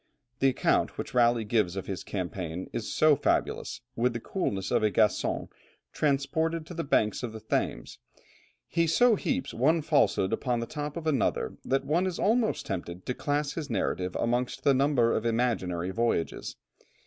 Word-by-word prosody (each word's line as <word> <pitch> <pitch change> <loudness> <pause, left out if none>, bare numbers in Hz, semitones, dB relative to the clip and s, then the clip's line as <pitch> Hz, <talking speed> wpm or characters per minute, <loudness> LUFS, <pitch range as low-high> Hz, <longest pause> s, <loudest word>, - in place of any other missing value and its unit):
The 135 - +4
account 130 - +1
which - - -5
Raleigh 120 -2 +4
gives 105 -4 +1
of 95 - -4
his 95 -2 -5
campaign 90 -2 -4
is 115 - -3
so 155 -1 +5
fabulous, - - -1
with 120 +1 +1
the 115 - -3
coolness 100 - -2
of - - +3
a 110 - +3
Gascon 105 +2 +1 0.5
transported 155 +3 0
to 175 - -9
the 165 -1 -3
banks 110 -6 +1
of 120 -3 -4
the 110 - -7
Thames, 110 - -2 0.7
he 170 0 +1
so 245 +9 +5
heaps 265 +4 -2
one 155 +7 +2
falsehood 145 - +2
upon 125 -3 0
the 115 - -2
top 150 +4 -5
of 165 - -6
another, 145 -7 0
that 135 +1 0
one 170 +6 +1
is 180 - -3
almost 225 +2 +1
tempted 90 -2 -5
to 125 - -1
class 145 +3 -1
his 155 -2 -5
narrative 95 -4 -1
amongst 125 +1 -1
the 140 - +5
number 130 -3 +3
of 110 - 0
imaginary 110 -7 0
voyages. 115 -6 -1
125 Hz, 170 wpm, -28 LUFS, 105-150 Hz, 0.7 s, so